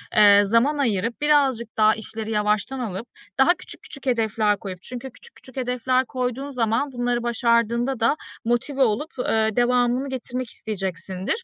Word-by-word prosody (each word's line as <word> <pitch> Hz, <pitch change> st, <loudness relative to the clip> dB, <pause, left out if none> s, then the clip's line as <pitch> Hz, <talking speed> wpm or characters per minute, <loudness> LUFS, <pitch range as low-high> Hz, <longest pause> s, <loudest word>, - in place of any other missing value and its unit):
eee, 205 Hz, -1 st, +7 dB
zaman 230 Hz, +9 st, +2 dB
ayırıp, 230 Hz, -2 st, -1 dB
birazcık 270 Hz, -6 st, +2 dB
daha 215 Hz, 0 st, +5 dB
işleri 220 Hz, 0 st, -6 dB
yavaştan 210 Hz, +4 st, 0 dB
alıp, 225 Hz, -1 st, -4 dB, 0.3 s
daha 270 Hz, +6 st, +6 dB
küçük, -, -, -11 dB
küçük 275 Hz, -2 st, -9 dB
hedefler 220 Hz, -4 st, +1 dB
koyup 185 Hz, -3 st, -7 dB
çünkü 250 Hz, +5 st, -7 dB
küçük, -, -, -13 dB
küçük 260 Hz, 0 st, -15 dB
hedefler 255 Hz, 0 st, +1 dB
koyduğun 255 Hz, +2 st, -3 dB
zaman 245 Hz, +1 st, 0 dB
bunları 245 Hz, -1 st, -1 dB
başardığında 235 Hz, +1 st, +1 dB
da 230 Hz, +5 st, +3 dB, 0.3 s
motive 240 Hz, +4 st, 0 dB
olup, 260 Hz, +7 st, 0 dB
eee, 220 Hz, -3 st, +2 dB
devamını 245 Hz, 0 st, +3 dB
getirmek 255 Hz, -1 st, -4 dB
isteyeceksindir. 190 Hz, -, -4 dB
240 Hz, 145 wpm, -23 LUFS, 220-260 Hz, 0.3 s, eee